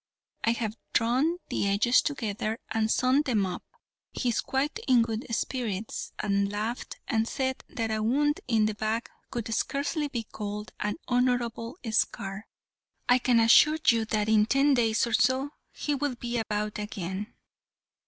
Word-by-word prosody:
I 230 - +3
have 220 -2 -3 0.2
drawn 260 +9 +2
the - - 0
edges 205 +5 +4
together 220 -5 -2
and 225 0 +1
sewn 255 +5 +3
them 230 -9 +1
up; 180 - -4 0.5
he 250 - -1
is 235 - +1
quite 285 +8 -1
in 245 -3 +5
good 225 +1 -4
spirits, 225 -3 -3
and 200 -1 0
laughed 215 +4 -4
and 225 0 +1
said 260 0 -2
that 225 -1 -2
a 215 0 0
wound 290 +7 +2
in 225 -3 +3
the 215 - 0
back 220 +2 -2 0.2
could 230 -2 -4
scarcely 290 +5 -1
be 240 -5 -3
called 210 -1 -6
an 210 0 -1
honourable 245 0 0
scar. 200 -1 -1 0.6
I 250 +1 +5
can 245 -1 +3
assure 235 +7 +6
you 230 -2 +3
that 215 -1 0
in 215 -1 +4
ten 275 +3 +4
days 225 -3 +2
or 235 - -4
so 260 +3 +2 0.2
he 295 - -2
will 285 -2 -1
be 240 0 -3
about 210 -1 -2
again." 205 0 -5
230 Hz, 160 wpm, -28 LUFS, 215-255 Hz, 0.6 s, assure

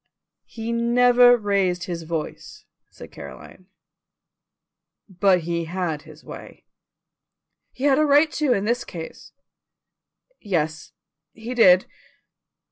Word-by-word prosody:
"He 225 0 -6
never 245 +1 +5
raised 195 -4 0
his 170 -1 -5
voice," 160 -1 -6 0.2
said - - -13
Caroline; 185 - -12 1.4
"but 190 -1 +2
he 170 0 -3
had 170 -3 -3
his 155 -1 -16
way." - - -12 1.1
"He 260 - -10
had 280 0 +3
a - - +4
right 295 +2 +4
to 300 -4 0
in 205 -4 +1
this 240 +2 0
case." 165 -2 -10 1.1
"Yes, 160 -6 -3 0.4
he 230 +3 -7
did." 185 -6 +5
195 Hz, 110 wpm, -23 LUFS, 170-245 Hz, 1.4 s, never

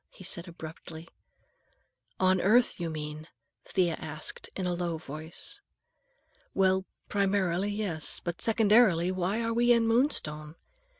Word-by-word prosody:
he - - -14
said 170 0 -4
abruptly. 165 0 -9 1.1
"On 185 -1 +3
earth, 235 +4 +3
you 170 -1 -2
mean?" 155 0 -6 0.4
Thea 180 -3 +1
asked 155 0 -5
in 190 - -3
a 180 - 0
low 175 -2 -2
voice. 155 +1 -6 0.9
"Well, 190 0 +3 0.2
primarily, 195 -2 +1
yes. 200 -7 -2
But 175 -1 -5
secondarily, 215 -5 +4
why 185 +5 -1
are 230 0 0
we 240 +1 +3
in 230 -1 +4
Moonstone? 155 - +1
185 Hz, 125 wpm, -29 LUFS, 160-205 Hz, 1.1 s, secondarily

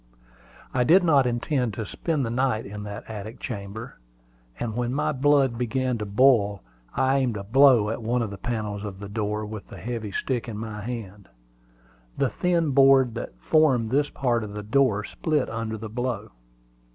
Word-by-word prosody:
I 125 - +2
did 180 +9 +5
not 145 -6 +4
intend 120 -1 -1
to 110 - -4
spend 150 - -2
the 115 - -3
night 125 -2 0
in 105 +1 -7
that 100 0 -7
attic 110 +2 -7
chamber; 110 - -7 0.6
and 110 -3 -3
when 120 +1 -1
my 150 - +1
blood 135 -3 +2
began 125 0 -1
to 105 - -4
boil, 105 -2 +3 0.3
I 130 +1 +2
aimed 125 -5 0
a 100 - -5
blow 120 -1 +5
at 115 - -4
one 120 +2 0
of 110 - -4
the 100 - -8
panels 105 -4 -3
of 100 -3 -6
the 100 - -7
door 105 0 -2
with 110 -1 -8
the - - -11
heavy 115 -3 -5
stick 120 +2 -2
in 105 - -5
my 110 -1 -5
hand. 105 - -7 0.9
The 135 - +2
thin 170 - +1
board 135 -2 +5
that 115 - -6
formed 135 -8 +2
this 145 +2 +2
part 120 -4 0
of 105 -1 -7
the 105 0 -5
door 110 -2 +2
split 150 +5 -1
under 110 -1 -3
the 110 +1 -6
blow. 115 -1 -3
115 Hz, 185 wpm, -25 LUFS, 105-130 Hz, 0.9 s, did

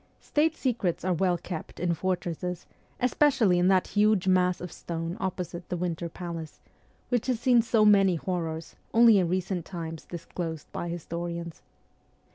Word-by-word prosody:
State 315 +2 +1
secrets 220 - -1
are 185 - +2
well 180 +1 +1
kept 170 -1 -7
in 175 0 +1
fortresses, 180 -1 -3 0.3
especially 250 -8 +3
in 180 - +3
that 190 -1 +3
huge 210 -2 +3
mass 180 -1 +3
of 180 -2 -7
stone 165 0 -5
opposite 180 -3 -4
the 180 - -2
Winter 170 -1 -2
Palace, 165 -2 -7 0.5
which 245 -1 0
has 250 -3 +1
seen 245 -1 +5
so 225 -1 +3
many 195 -3 +5
horrors, 165 -2 -4 0.2
only 230 -3 +7
in 175 -3 +1
recent 185 -1 -1
times 165 -2 -6
disclosed 165 -2 -5
by 175 - -4
historians. 170 0 -5
180 Hz, 150 wpm, -28 LUFS, 170-200 Hz, 0.5 s, only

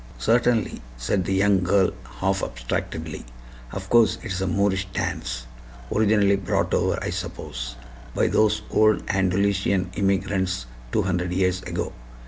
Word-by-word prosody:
"Certainly," 120 -1 +2 0.2
said 85 +10 0
the 95 - 0
young 100 -1 +4
girl, 95 +1 +3 0.3
half 95 +1 +1
abstractedly. 75 +6 -4 0.5
"Of 95 0 -6
course 115 -2 +5
it's 95 -4 -3
a 95 - 0
Moorish 95 +1 +1
dance, 60 -8 -3 0.5
originally 105 -2 +4
brought 95 - -1
over, - - +2
I - - -2
suppose, - - -5 0.4
by - - +3
those 105 0 +2
old 110 0 +4
Andalusian 95 -1 +1
immigrants 95 - 0 0.3
two - - +2
hundred 90 -2 -1
years 90 0 +1
ago. - - -4
95 Hz, 130 wpm, -24 LUFS, 90-100 Hz, 0.5 s, course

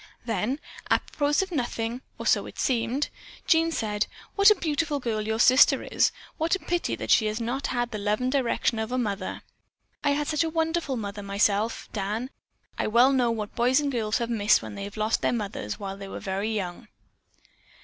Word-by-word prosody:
Then 225 +5 -1 0.3
apropos 295 +3 +1
of 380 - -8
nothing 240 -4 -2 0.2
(or - - -7
so - - +3
it - - -12
seemed), 245 +3 0 0.4
Jean 330 0 +3
said: 210 -6 -1 0.3
"What 400 +1 +7
a 425 - +6
beautiful 310 -4 -1
girl 230 -4 -2
your 220 +1 -1
sister 255 +3 +6
is. - - +2 0.3
What 325 +3 +2
a - - -5
pity 350 -1 -1
that - - -3
she 215 - +5
has 215 +2 -2
not 245 +4 -2
had 240 0 -1
the 215 - -4
love 210 +1 0
and 255 0 0
direction 250 -4 +1
of 220 +2 -3
a 255 - 0
mother. 205 -6 -3 0.6
I 285 -1 +3
had 295 +1 0
such 305 +2 +1
a 325 - -1
wonderful 320 -4 -1
mother 205 -1 -5
myself, 200 +2 0
Dan, 215 +5 -3 0.5
I - - +1
well 240 +5 +5
know 250 -3 +3
what 215 -3 -3
girls 250 +3 +3
and 290 -1 -1
boys 220 -4 0
have 235 -1 -2
missed 210 -2 +3
when - - -7
they 200 0 -5
lost 215 +2 -1
their - - +2
mothers 200 - -4
while 195 -1 -5
they 200 0 -8
were - - -6
very 195 +1 -2
young." 200 +1 -4
235 Hz, 200 wpm, -26 LUFS, 210-280 Hz, 0.6 s, What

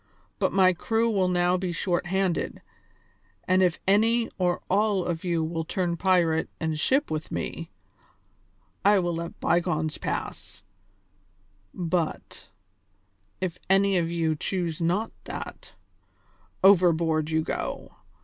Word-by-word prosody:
But - - +1
my 185 -1 +4
crew 225 +6 0
will 190 -3 +2
now 180 0 +2
be 180 -1 -2
short 175 0 -1
handed, 190 -1 -1 0.8
and 185 0 +4
if 180 -2 +2
any 225 +4 +3
or 180 -1 0
all 200 -1 +1
of 170 -2 -3
you 170 -3 0
will 165 0 -2
turn 175 +1 -1
pirate 170 -3 +2
and 160 -1 -2
ship 270 - +1
with 155 0 -4
me, 165 0 -4 1.1
I 205 0 +5
will 175 -2 0
let 170 0 -6
bygones 160 -3 0
pass; - - -5 1.1
but, 165 - -3 0.9
if 180 -2 -3
any 195 0 +4
of 165 -1 0
you 165 -2 0
choose 170 0 -3
not 185 +7 0
that, - - -8 0.9
overboard 165 -5 +4
you 160 0 +1
go. - - -4
175 Hz, 125 wpm, -26 LUFS, 165-190 Hz, 1.1 s, I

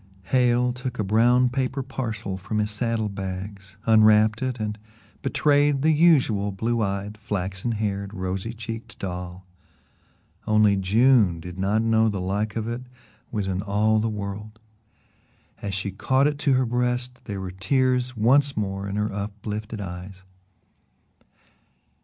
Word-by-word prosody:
Hale 125 -1 +3
took 125 0 -5
a 105 - 0
brown 120 +5 +4
paper 130 +1 -2
parcel 115 -7 -4
from 100 +3 -4
his 105 0 0
saddle 110 0 -1
bags, 95 0 -6
unwrapped 110 -1 +5
it 130 -2 -2
and 105 0 -3 0.4
betrayed 145 0 +2
the 160 - +5
usual 135 -11 +3
blue 115 +4 -1
eyed, 100 +1 -3
flaxen 100 +1 -3
haired, 100 -2 -2
rosy 95 +2 -3
cheeked 115 0 -7
doll. 90 -1 -6 1.0
Only 105 -2 +4
June 100 -1 +4
did 90 +2 -9
not 105 +4 +1
know 110 0 +3
the 100 -2 -3
like 100 +3 -2
of 110 -1 -2
it 120 +1 -3 0.5
was 105 -4 -2
in 95 0 -1
all 105 +2 +2
the 110 +1 0
world. 105 +1 -6 1.0
And - - -8
as 100 - -2
she 100 +1 -3
caught 130 +8 +2
it 145 -1 0
to 145 -3 +2
her 130 0 +3
breast 125 +1 -2
there 100 -3 -4
were 95 -1 -5
tears 125 +5 0
once 140 +5 +3
more 100 -1 -2
in 100 - -4
her 105 0 -1
uplifted 105 +1 -5
eyes. 95 0 -8
110 Hz, 145 wpm, -24 LUFS, 100-125 Hz, 1.0 s, unwrapped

